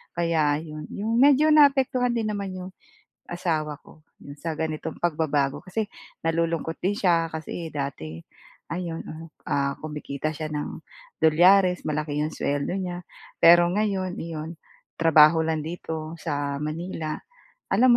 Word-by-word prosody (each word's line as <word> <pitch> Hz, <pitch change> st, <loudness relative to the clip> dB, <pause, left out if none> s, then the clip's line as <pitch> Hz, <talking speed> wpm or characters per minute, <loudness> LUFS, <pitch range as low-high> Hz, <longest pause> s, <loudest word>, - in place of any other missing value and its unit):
Kaya 160 Hz, -4 st, +2 dB
'yon, 155 Hz, -1 st, -8 dB
'yong 220 Hz, +3 st, -2 dB
medyo 285 Hz, +3 st, +6 dB
naapektuhan 265 Hz, -4 st, +4 dB
din 230 Hz, -2 st, -1 dB
naman 200 Hz, -2 st, -4 dB
'yong 185 Hz, 0 st, -7 dB, 0.5 s
asawa 155 Hz, -4 st, -2 dB
ko 155 Hz, -1 st, -19 dB, 0.2 s
'yong 140 Hz, +1 st, -10 dB
sa 165 Hz, +1 st, -3 dB
ganitong 155 Hz, -1 st, -4 dB
pagbabago 150 Hz, -4 st, 0 dB
kasi 205 Hz, +3 st, -2 dB, 0.3 s
nalulungkot 165 Hz, 0 st, -1 dB
din 195 Hz, +3 st, +1 dB
siya 170 Hz, -3 st, +3 dB
kasi 160 Hz, +1 st, -5 dB
dati 85 Hz, -, -5 dB, 0.5 s
ayon, 170 Hz, -2 st, -4 dB, 0.5 s
ah, 140 Hz, 0 st, +1 dB
kumikita 150 Hz, -1 st, -4 dB
siya 155 Hz, +1 st, -5 dB
ng 150 Hz, -, -4 dB, 0.4 s
dolyares, 180 Hz, +3 st, +5 dB
malaki 150 Hz, -1 st, -1 dB
'yong 155 Hz, +1 st, -1 dB
suweldo 145 Hz, +4 st, -1 dB
niya 180 Hz, -2 st, -4 dB, 0.4 s
pero 175 Hz, +1 st, +8 dB
ngayon 195 Hz, -2 st, -1 dB
iyon, 160 Hz, 0 st, -5 dB, 0.5 s
trabaho 160 Hz, 0 st, +7 dB
lang 160 Hz, -1 st, -1 dB
dito 160 Hz, -1 st, -5 dB
sa 145 Hz, -2 st, -2 dB
Manila. 155 Hz, 0 st, -4 dB, 0.6 s
Alam 245 Hz, 0 st, +6 dB
165 Hz, 130 wpm, -25 LUFS, 150-185 Hz, 0.6 s, pero